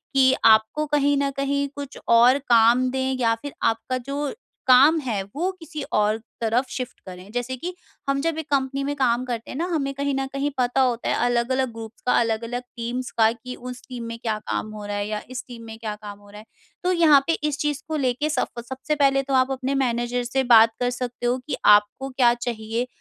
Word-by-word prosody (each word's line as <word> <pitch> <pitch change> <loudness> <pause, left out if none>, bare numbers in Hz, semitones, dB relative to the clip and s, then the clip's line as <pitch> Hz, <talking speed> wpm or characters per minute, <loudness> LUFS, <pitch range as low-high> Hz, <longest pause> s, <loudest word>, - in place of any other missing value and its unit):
कि 265 -1 +5
आपको 220 +7 +4
कहीं 285 -1 +2
न 280 0 +1
कहीं 280 +1 0
कुछ 285 -1 -7
और 240 +3 +6
काम 240 0 +4
दें 265 0 -1
या 230 -2 +3
फिर 280 +5 -8
आपका 230 +3 0
जो 280 +3 -3 0.4
काम 275 +6 +7
है 235 -9 -2
वो 350 +6 0
किसी 325 -2 -7
और 210 +1 +2 0.2
तरफ 230 +3 +1
शिफ्ट 255 -1 -6
करें, 185 +2 -10
जैसे 245 +2 -3
कि 355 +7 -5 0.4
हम 275 0 +1
जब 330 +1 -1
एक 320 - -4
कंपनी 275 0 0
में 285 +1 -2
काम 250 -2 +1
करते 235 -2 -5
हैं - - -6
ना 335 - -1
हमें 275 -3 -1
कहीं 280 +1 -2
न 270 - -1
कहीं 275 +1 -1
पता 250 +1 +2
होता 245 -2 0
है - - +2
अलग-अलग 245 +1 +1
ग्रुप्स 225 -1 -10
का 250 - +2
अलग-अलग 230 +2 -2
टीम्स 245 +2 -4
का 220 -1 +5
कि 250 +2 -8
उस 250 0 -8
टीम 250 -3 -7
में 230 0 -6
क्या 225 -3 -2
काम 215 - -2
हो 210 -1 -7
रहा 205 0 -4
है 205 0 -2
या 210 0 -3
इस 255 -1 -5
टीम 235 -2 -10
में 220 0 -9
क्या 220 -2 -5
काम 205 -1 -10
हो 205 0 -18
रहा 210 +1 -11
है? 215 - -14 0.4
तो 365 - +2
यहाँ 325 -5 +6
पे 330 - +3 0.2
इस 290 - -3
चीज़ 295 -1 -1
को 315 - -3
लेके 265 +2 0
सफ 270 -5 -2
सबसे 265 +3 -2
पहले 275 -2 +3
तो 275 0 -4
आप 265 - -7
अपने 265 +1 -2
मैनेजर 240 0 -1
से 265 +2 0
बात 225 0 +7
कर 245 0 +1
सकते 245 0 -5
हो 245 +1 +2
कि - - -2 0.2
आपको 210 +6 -1
क्या 255 -2 +3
चाहिए, 235 0 -3
250 Hz, 225 wpm, -23 LUFS, 230-275 Hz, 0.4 s, काम